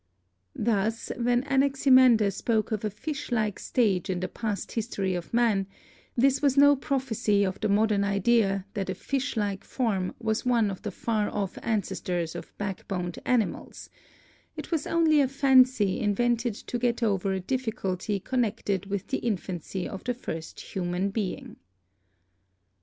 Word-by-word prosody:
Thus 220 0 0
when 245 +1 +1
Anaximander 265 -5 +4
spoke 220 +3 -1
of 215 -1 -2
a 215 - 0
fish 275 +8 -6
like 215 -4 0
stage 200 -9 +1
in 180 -1 -1
the 185 - -2
past 210 +2 -4
history 205 -4 -2
of 175 -1 -5
man, 225 -5 +2 0.5
this 270 +2 +3
was 280 -2 +2
no 285 0 +7
prophecy 245 -7 0
of 190 0 -3
the 215 - -1
mod 215 +2 +3
ern 200 -1 +2
idea 200 -1 +2
that 195 -2 -3
a 190 - -2
fish 270 +5 -3
like 200 -2 -1
form 200 -8 -1
was 220 -1 -1
one 235 -5 +2
of 190 - -7
the - - -4
far 210 +2 -1
off 200 -3 -3
ADAPTATION 220 -4 -2
293 180 -1 -1
ancestors 165 -2 -3
of - - -9
backboned 185 -3 -4
animals; 240 -5 -1 0.7
it - - -7
was 320 -3 -1
only 320 -3 +4
a 270 - +3
fancy 255 -6 +4
in 205 -1 +1
vented 240 -1 +1
to 240 - -5
get 240 0 0
over 195 -3 +1
a 190 - -1
difficulty 210 -3 -2
connected 210 -5 -1
with 200 -1 -3
the - - 0
infancy 185 -4 -3
of 195 - -7
the 245 -1 -1
first 165 -9 -6
human 180 +1 -1
being. 200 -3 -4
215 Hz, 165 wpm, -27 LUFS, 195-245 Hz, 0.7 s, no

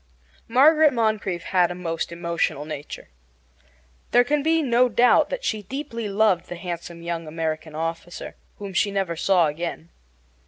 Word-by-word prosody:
Margaret 300 +5 +5
Moncrieffe 215 -7 -1
had 180 -2 +4
a 175 - -5
most 170 -2 -3
emotional 170 -4 -2
nature. 150 -1 -8 1.0
There 245 - +5
can 290 +3 0
be 320 +2 +2
no 250 -1 +3
doubt 240 +2 +4
that - - -4
she 215 - -1
deeply 235 -1 -5
loved 200 -3 +2
the 175 - -5
handsome 170 -1 -7
young 170 -1 -4
American 155 0 -4
officer, 165 +2 -5 0.2
whom 200 -2 -7
she 205 +3 +2
never 195 -4 -1
saw 180 +1 +3
again. 165 +2 -4
180 Hz, 150 wpm, -24 LUFS, 170-235 Hz, 1.0 s, Margaret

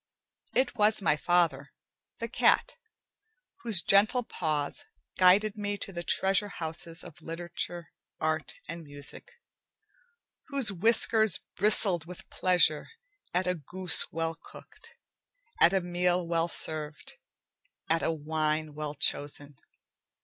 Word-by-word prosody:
It 260 0 +1
was 215 0 +3
my 170 -6 +2
father, 160 -4 0 0.4
the - - -4
cat, - - +2 0.8
whose 215 - +4
gentle 215 +5 +4
paws 155 -8 -2 0.4
guided 200 +3 +4
me 205 -1 -3
to 195 - -7
the 175 - -4
treasure 195 +3 +1
houses 165 -2 -4
of 165 -4 -12
literature, 170 0 -6 0.3
art, 155 -1 -2
and 170 +2 -7
music, 145 - -10 1.2
whose 275 -8 +1
whiskers 220 +2 +4
bristled 195 -4 +2
with 180 +1 -11
pleasure 175 -4 +3 0.4
at 180 +1 0
a 180 - +1
goose 180 +1 +1
well 165 +1 -2
cooked, 455 - -15 0.6
at 170 - +6
a 195 -1 +1
meal 175 0 0
well 165 0 0
served, 155 -3 -3 0.7
at 165 +1 +1
a - - 0
wine 155 0 -2
well 150 0 -5
chosen. 145 0 0
175 Hz, 120 wpm, -29 LUFS, 155-195 Hz, 1.2 s, at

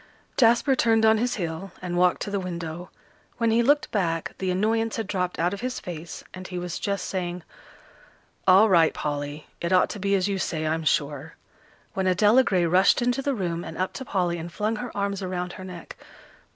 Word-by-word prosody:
Jasper 240 +3 +4
turned 225 -2 +3
on 220 0 +5
his 245 +2 0
heel, 175 0 -4
and 180 -1 -4
walked 180 0 +3
to 205 - -5
the 200 - 0
window. 175 -1 -5 0.5
When 230 -2 +2
he 230 +1 +4
looked 290 +5 +2
back, 165 -6 -1
the 190 - -1
annoyance 220 +4 +1
had 225 - -2
dropped 180 -2 -2
out 175 +3 +1
of 200 - -6
his 255 0 -3
face, 165 -2 -7
and 185 0 -8
he 180 - -6
was 175 -1 -4
just 200 -1 -2
saying, 180 -2 -3 1.0
"All 190 +4 +7
right, 170 -5 +4
Polly, 145 0 -4 0.2
it 170 - -2
ought 185 -1 +4
to 210 - -6
be 200 +1 +1
as 190 0 +1
you 195 -1 -1
say, 155 -4 -2
I'm 160 +1 -1
sure," 145 +1 -1 0.6
when 190 -1 -1
Adela 210 +7 +5
Gray 185 -7 +2
rushed 185 +7 +4
into 245 +2 +1
the 275 0 -1
room 175 -5 -2
and 160 - -8
up 185 +1 -1
to 265 - -6
Polly, 180 -7 -1
and 170 +1 -7
flung 215 +4 -1
her 245 +2 -5
arms 200 0 -1
around 180 -1 -3
her 185 - -9
neck. 180 -3 -9
185 Hz, 205 wpm, -25 LUFS, 175-215 Hz, 1.0 s, All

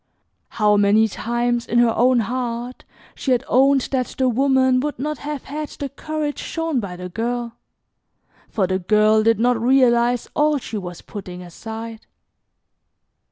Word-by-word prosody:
How 210 -1 +4
many 205 +2 +4
times 240 +2 -2
in 235 - 0
her 240 -1 +4
own 250 0 +3
heart 245 +1 -4 0.3
she 265 - 0
had 245 +1 0
owned 270 +2 +4
that 255 -2 0
the 260 -1 +2
woman 260 +1 +3
would 295 +2 -3
not 300 +3 -3
have 295 -2 -5
had 300 +1 -5
the 280 - -6
courage 300 +1 -4
shown 325 -5 -2
by 195 -5 -5
the 180 0 -7
girl, 235 +4 -3 1.0
for 200 - 0
the 185 +1 -1
girl 215 +3 +3
did 225 0 +2
not 240 -1 +2
realize 245 -1 +3
all 300 0 +3
she 225 -5 -5
was 180 -2 -8
putting 180 -3 -8
aside. 225 +5 -8
240 Hz, 155 wpm, -21 LUFS, 220-265 Hz, 1.0 s, How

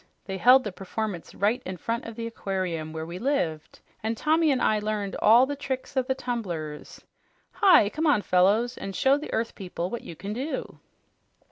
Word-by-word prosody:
They 190 -1 -5
held 255 +4 +7
the 210 - -4
performance 195 -1 -5
right 220 +5 +1
in 185 0 -6
front 230 +7 -3
of 230 - -7
the 230 0 -5
aquarium 185 -8 -3
where 160 0 -5
we 170 +2 -7
lived, 185 - -2 0.2
and 225 +1 -2
Tommy 315 +3 +3
and 265 -3 +2
I 215 - +2
learned 210 -1 -3
all 235 +4 +6
the 285 +2 -4
tricks 270 -2 -5
of 260 -1 +1
the 265 - +1
tumblers. 180 - -5 0.5
Hi! 380 - +6
Come 315 +7 -1
on, 285 -9 +3
fellows, 205 +7 +2
and 195 -1 -6
show 265 +11 +4
the 300 - -7
earth 230 +1 -1
people 180 -2 -5
what 235 - -4
you 165 - -9
can 200 +5 -5
do!" 270 +7 -4
215 Hz, 195 wpm, -26 LUFS, 185-255 Hz, 0.5 s, held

